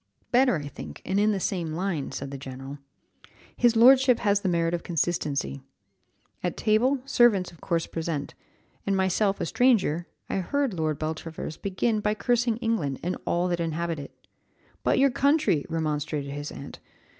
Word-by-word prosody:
"Better 250 Hz, -2 st, +4 dB
I 145 Hz, -3 st, -4 dB
think, 80 Hz, -, -9 dB
and 190 Hz, +2 st, +1 dB
in 210 Hz, +1 st, +4 dB
the 200 Hz, -, -1 dB
same 175 Hz, -4 st, -2 dB
line," 170 Hz, -4 st, -2 dB
said 140 Hz, 0 st, -5 dB
the 140 Hz, -, -5 dB
general: 135 Hz, +1 st, -8 dB, 0.8 s
"his 240 Hz, -1 st, +3 dB
lordship 255 Hz, +1 st, +7 dB
has 205 Hz, -2 st, +3 dB
the 195 Hz, -, -1 dB
merit 170 Hz, -1 st, +1 dB
of 175 Hz, -, -1 dB
consistency. 150 Hz, -, -1 dB, 0.8 s
At -, -, -2 dB
table, 245 Hz, +5 st, +2 dB
servants 240 Hz, -9 st, +3 dB
of 170 Hz, -, -18 dB
course 170 Hz, -3 st, 0 dB
present, 160 Hz, -3 st, -4 dB, 0.5 s
and 195 Hz, -1 st, +2 dB
myself 195 Hz, +2 st, +1 dB
a -, -, -1 dB
stranger, 185 Hz, -, +2 dB, 0.2 s
I -, -, -2 dB
heard 270 Hz, +6 st, 0 dB
Lord 155 Hz, -3 st, -1 dB
Beltravers 160 Hz, 0 st, -5 dB
begin 210 Hz, +3 st, 0 dB
by 210 Hz, 0 st, 0 dB
cursing 240 Hz, 0 st, +1 dB
England 225 Hz, -, -1 dB
and 180 Hz, +2 st, -1 dB
all 175 Hz, +1 st, +1 dB
that 175 Hz, -1 st, -1 dB
inhabit 165 Hz, 0 st, -2 dB
it. 140 Hz, -, -11 dB, 0.6 s
'But -, -, +2 dB
your 275 Hz, 0 st, +4 dB
country!' 280 Hz, -, +2 dB
remonstrated 150 Hz, -2 st, -2 dB
his 145 Hz, +1 st, -5 dB
aunt. 140 Hz, -, -9 dB
175 Hz, 165 wpm, -26 LUFS, 155-220 Hz, 0.8 s, lordship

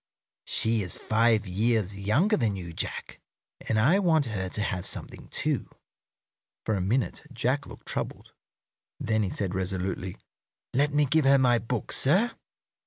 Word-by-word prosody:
She 110 Hz, -1 st, +2 dB
is 90 Hz, -3 st, -1 dB
five 110 Hz, -1 st, +2 dB
years 105 Hz, +1 st, 0 dB
younger 115 Hz, -, +2 dB
than 110 Hz, -, 0 dB
you, 85 Hz, -3 st, -7 dB
Jack, -, -, -5 dB, 0.5 s
and 110 Hz, -, +2 dB
I 155 Hz, -, +4 dB
want 160 Hz, -6 st, +3 dB
her 95 Hz, -5 st, -3 dB
to 105 Hz, -, -3 dB
have 90 Hz, -3 st, -2 dB
something, -, -, -3 dB
too." -, -, -1 dB, 1.0 s
For 110 Hz, -, +1 dB
a 100 Hz, -, 0 dB
minute 105 Hz, +1 st, 0 dB
Jack -, -, -1 dB
looked -, -, -12 dB
troubled; -, -, -4 dB, 0.7 s
then 110 Hz, -1 st, +1 dB
he 100 Hz, -, 0 dB
said, 95 Hz, 0 st, -2 dB
resolutely, 95 Hz, -1 st, -2 dB, 0.6 s
"Let 145 Hz, +3 st, +2 dB
me 145 Hz, 0 st, +3 dB
give 150 Hz, +2 st, +2 dB
her 140 Hz, 0 st, +6 dB
my 125 Hz, -3 st, +4 dB
book, 115 Hz, 0 st, -3 dB
sir." 195 Hz, -, +3 dB
110 Hz, 155 wpm, -27 LUFS, 95-135 Hz, 1.0 s, her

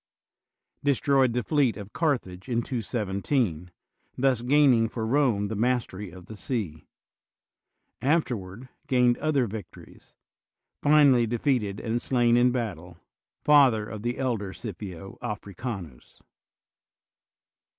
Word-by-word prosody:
destroyed 135 Hz, -2 st, +3 dB
the 125 Hz, 0 st, -1 dB
fleet 130 Hz, -4 st, +1 dB
of 100 Hz, 0 st, -9 dB
Carthage 125 Hz, -, -2 dB
in 120 Hz, -1 st, 0 dB
217, 105 Hz, -, -2 dB, 0.5 s
thus 130 Hz, -2 st, +2 dB
gaining 125 Hz, -3 st, +4 dB
for 115 Hz, -1 st, -4 dB
Borne 115 Hz, -5 st, +2 dB
the 110 Hz, -, -4 dB
mastery 110 Hz, -4 st, -1 dB
of 90 Hz, 0 st, -13 dB
the 110 Hz, -, -10 dB
sea; 100 Hz, -, -4 dB, 1.1 s
afterward 125 Hz, -, -1 dB, 0.2 s
gained 125 Hz, -2 st, +3 dB
other 145 Hz, -5 st, +1 dB
Tictories; 105 Hz, 0 st, -11 dB, 0.7 s
finally 145 Hz, -5 st, +5 dB
defeated 115 Hz, -4 st, 0 dB
and 120 Hz, +1 st, -2 dB
slain 120 Hz, -2 st, +2 dB
in 125 Hz, +1 st, +4 dB
battle; 90 Hz, -9 st, -4 dB, 0.5 s
father 135 Hz, -8 st, +5 dB
of 110 Hz, -1 st, -7 dB
the 120 Hz, +2 st, -2 dB
elder 115 Hz, -8 st, -2 dB
Scipio 95 Hz, -3 st, -8 dB
Africanus. 100 Hz, -, -7 dB
120 Hz, 110 wpm, -26 LUFS, 100-130 Hz, 1.1 s, finally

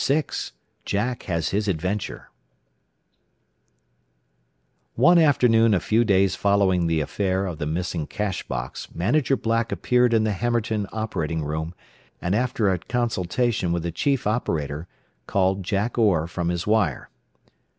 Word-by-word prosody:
VI 150 Hz, +3 st, +3 dB, 0.6 s
JACK 115 Hz, +5 st, -2 dB
HAS 85 Hz, -4 st, -1 dB
HIS 105 Hz, +2 st, -1 dB
ADVENTURE 95 Hz, +3 st, -3 dB, 2.6 s
One 170 Hz, +8 st, +6 dB
afternoon 115 Hz, -7 st, +4 dB
a -, -, +2 dB
few 110 Hz, +5 st, +2 dB
days 100 Hz, -3 st, +3 dB
following 100 Hz, -4 st, +2 dB
the 80 Hz, -1 st, +1 dB
affair 95 Hz, +4 st, -1 dB
of 85 Hz, -5 st, -5 dB
the 75 Hz, -, -2 dB
missing 80 Hz, -1 st, -2 dB
cash 100 Hz, -3 st, -3 dB
box 65 Hz, 0 st, -5 dB
Manager 135 Hz, -, +1 dB
Black 115 Hz, -1 st, 0 dB
appeared 125 Hz, +5 st, +2 dB
in 110 Hz, -, +3 dB
the 110 Hz, -, +1 dB
Hammerton 110 Hz, -1 st, -1 dB
operating 80 Hz, -8 st, -2 dB
room, 80 Hz, +3 st, -4 dB, 0.4 s
and 90 Hz, -, -1 dB
after 115 Hz, -3 st, +1 dB
a 90 Hz, -, 0 dB
consultation 115 Hz, -2 st, -1 dB
with 85 Hz, -1 st, -1 dB
the 85 Hz, -, -2 dB
chief 135 Hz, -, 0 dB
operator, 80 Hz, -, -2 dB, 0.4 s
called 95 Hz, 0 st, +1 dB
Jack 100 Hz, +6 st, -1 dB
Orr 95 Hz, -8 st, +3 dB
from 85 Hz, 0 st, -3 dB
his 85 Hz, 0 st, -2 dB
wire. 105 Hz, -, 0 dB
100 Hz, 135 wpm, -24 LUFS, 85-115 Hz, 2.6 s, One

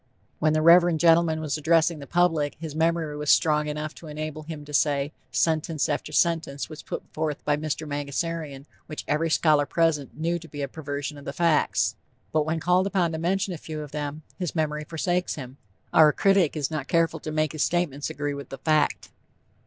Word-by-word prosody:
When 155 Hz, 0 st, +2 dB
the 155 Hz, 0 st, +1 dB
Reverend 170 Hz, 0 st, +6 dB
gentleman 165 Hz, -1 st, +4 dB
was 150 Hz, -2 st, -2 dB
addressing 165 Hz, +1 st, +3 dB
the 140 Hz, -, -9 dB
public 165 Hz, -4 st, +1 dB
his 160 Hz, -3 st, -6 dB
memory 160 Hz, -1 st, 0 dB
was 150 Hz, -1 st, -3 dB
strong 150 Hz, -1 st, +4 dB
enough 150 Hz, +1 st, -4 dB
to 165 Hz, -, -12 dB
enable 155 Hz, 0 st, -5 dB
him 155 Hz, -1 st, -8 dB
to 150 Hz, -, -11 dB
say, 145 Hz, 0 st, +1 dB, 0.2 s
"sentence 160 Hz, -1 st, +1 dB
after 150 Hz, 0 st, -2 dB
sentence 160 Hz, -3 st, +1 dB
was 155 Hz, -1 st, -9 dB
put -, -, -6 dB
forth 155 Hz, -2 st, -3 dB
by 150 Hz, -, +3 dB
Mr. 155 Hz, +1 st, -3 dB
Mangasarian 145 Hz, 0 st, -3 dB, 0.2 s
which 155 Hz, -, -6 dB
every 155 Hz, +3 st, +1 dB
scholar 150 Hz, -2 st, +3 dB
present 165 Hz, -5 st, 0 dB
knew 170 Hz, +2 st, 0 dB
to 165 Hz, -, -12 dB
be 145 Hz, -2 st, -6 dB
a -, -, -1 dB
perversion 145 Hz, 0 st, -5 dB
of 140 Hz, -, -13 dB
the 140 Hz, -, -4 dB
facts." 165 Hz, 0 st, +2 dB, 0.4 s
But 155 Hz, -1 st, +1 dB
when 160 Hz, +1 st, 0 dB
called 180 Hz, +3 st, +2 dB
upon 185 Hz, -4 st, +1 dB
to 160 Hz, -, -4 dB
mention 185 Hz, +3 st, 0 dB
a 165 Hz, -, -7 dB
few 155 Hz, -1 st, -6 dB
of 150 Hz, -2 st, -8 dB
them, 150 Hz, +1 st, -4 dB, 0.2 s
his 180 Hz, -3 st, -3 dB
memory 150 Hz, -1 st, -1 dB
forsakes 175 Hz, +3 st, -1 dB
him. 130 Hz, -2 st, -9 dB, 0.4 s
Our 155 Hz, -1 st, +7 dB
critic 195 Hz, -3 st, +2 dB
is 145 Hz, 0 st, -1 dB
not 150 Hz, -3 st, -3 dB
careful 165 Hz, -1 st, +1 dB
to 155 Hz, -, -6 dB
make 155 Hz, -1 st, 0 dB
his 155 Hz, -, -4 dB
statements 160 Hz, -5 st, 0 dB
agree 145 Hz, -2 st, -3 dB
with 140 Hz, 0 st, -8 dB
the 135 Hz, -, -7 dB
fact. 155 Hz, -2 st, +1 dB
155 Hz, 200 wpm, -25 LUFS, 150-165 Hz, 0.4 s, Our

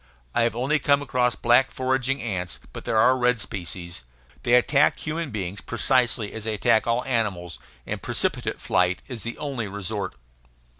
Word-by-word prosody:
I -, -, +2 dB
have 115 Hz, -1 st, +1 dB
only 135 Hz, +6 st, +1 dB
come 140 Hz, 0 st, +3 dB
across 125 Hz, -3 st, +1 dB
black 120 Hz, +3 st, +4 dB
foraging 130 Hz, +1 st, -1 dB
ants; 90 Hz, -6 st, -3 dB
but -, -, -8 dB
there 110 Hz, -, 0 dB
are 130 Hz, +4 st, +5 dB
red 125 Hz, -1 st, +3 dB
species. 85 Hz, -, -4 dB, 0.4 s
They 120 Hz, -, +4 dB
attack 140 Hz, +4 st, +4 dB
human 160 Hz, 0 st, -3 dB
beings 100 Hz, -3 st, -4 dB
precisely 120 Hz, -2 st, +1 dB
as 110 Hz, -1 st, -5 dB
they 110 Hz, -1 st, -1 dB
attack 110 Hz, +2 st, +3 dB
all 120 Hz, +1 st, +1 dB
animals, 100 Hz, -9 st, -2 dB, 0.3 s
and -, -, -4 dB
precipitate -, -, -1 dB
flight 90 Hz, 0 st, +1 dB
is 120 Hz, -4 st, -6 dB
the 115 Hz, 0 st, -5 dB
only 135 Hz, -7 st, -3 dB
resort. 100 Hz, -2 st, -4 dB
120 Hz, 165 wpm, -25 LUFS, 100-130 Hz, 0.4 s, are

